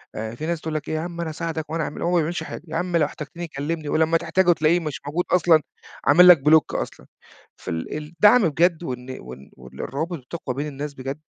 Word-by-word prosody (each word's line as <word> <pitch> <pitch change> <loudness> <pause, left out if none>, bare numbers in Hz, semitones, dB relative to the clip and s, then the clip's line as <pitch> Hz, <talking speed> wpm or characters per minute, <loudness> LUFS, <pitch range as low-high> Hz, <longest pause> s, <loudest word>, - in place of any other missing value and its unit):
آآ 110 +1 -5
في 155 - -6
ناس 170 -1 -2
تقول 160 -1 -4
لك 150 - -3
يا 155 - -1
عم 170 +1 -5
أنا 165 - -3
أساعدك 160 -1 -4
وأنا 165 0 -1
أعمل 150 - -6
وهو 175 - 0
ما 180 - +3
بيعملش 165 +1 -1
حاجة. 160 - -8
يا 160 - -6
عم 175 +1 0
لو 155 - +3
احتجتني 160 +4 -7
كلّمني 150 +1 -4
ولمّا 160 +1 +3
تحتاجه 185 +1 +2
تلاقيه 160 +2 +2
مش 155 -4 -5
موجود 170 +5 -1
أصلًا 170 -3 +5 0.4
عامل 180 +5 +7
لك 175 -4 +9
بلوك 155 -1 +4
أصلًا. - - -5 0.5
فال 80 - -5
الدعم 170 +6 +4
بجد 170 +3 +2
وإن 130 -2 -6
وإن 65 +2 -12
وإن 65 0 -14
الروابط 160 +5 -3
بتقوى 130 -1 -6
بين 145 +2 -3
الناس 145 0 -6
بجد، 135 +3 -6
160 Hz, 215 wpm, -23 LUFS, 145-170 Hz, 0.5 s, لك